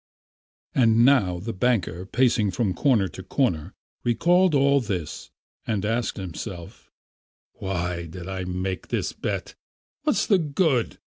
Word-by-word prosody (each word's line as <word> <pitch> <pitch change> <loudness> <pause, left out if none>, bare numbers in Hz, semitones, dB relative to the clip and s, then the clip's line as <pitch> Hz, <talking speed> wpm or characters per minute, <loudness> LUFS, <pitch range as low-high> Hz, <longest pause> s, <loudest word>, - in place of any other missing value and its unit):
And 115 -2 +4
now 110 -10 +4
the 110 +6 -5
banker, 95 -4 0
pacing 115 -2 +2
from 95 0 0
corner 110 -2 +2
to 85 - -9
corner, 95 - -1 0.3
recalled 175 +8 +3
all 140 0 +4
this 95 -9 -4 0.4
and 105 -2 -1
asked 115 +2 -1
himself: 90 -1 -7 0.6
"Why 90 -2 -3
did 85 +2 -8
I 95 -1 -4
make 90 +1 -3
this - - -2
bet? - - -4 0.5
What's - - +2
the 195 - +4
good? 145 -5 +1
105 Hz, 130 wpm, -25 LUFS, 90-125 Hz, 0.6 s, And